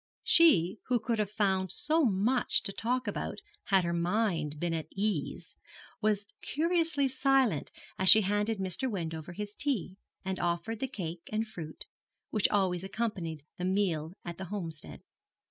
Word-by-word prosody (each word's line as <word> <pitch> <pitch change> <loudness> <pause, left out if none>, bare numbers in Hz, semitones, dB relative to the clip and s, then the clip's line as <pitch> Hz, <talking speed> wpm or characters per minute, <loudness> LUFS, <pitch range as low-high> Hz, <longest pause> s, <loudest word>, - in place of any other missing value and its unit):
She 200 - +5
who 250 -2 +2
could 225 0 -1
have 210 -2 0
found 190 -3 +1
so 320 +1 +1
much 230 +3 +2
to 195 - -2
talk 250 +5 -1
about - - -3 0.3
had 195 -3 +4
her 170 0 -1
mind 170 -4 0
been 175 0 -1
at 160 -2 -3
ease, 195 -7 -2 0.5
was 210 -1 +1 0.2
curiously 325 -2 +1
silent 265 - +2 0.3
as 190 0 +6
she 220 - +10
handed 205 +2 0
Mr. 190 +7 -2
Wendover 165 -5 -4
his 205 +2 -5
tea, 210 - -1 0.3
and 190 -1 -2
offered 175 +6 -1
the 265 - -1
cake 175 -9 -6
and 220 +1 -1
fruit, 160 -7 -8 0.5
which 215 - +3
always 185 -3 +1
accompanied 190 -8 -3
the 180 - -1
meal 180 -5 0
at 175 0 -6
the 190 - -4
Homestead. 170 -5 -6
195 Hz, 155 wpm, -31 LUFS, 175-225 Hz, 0.5 s, she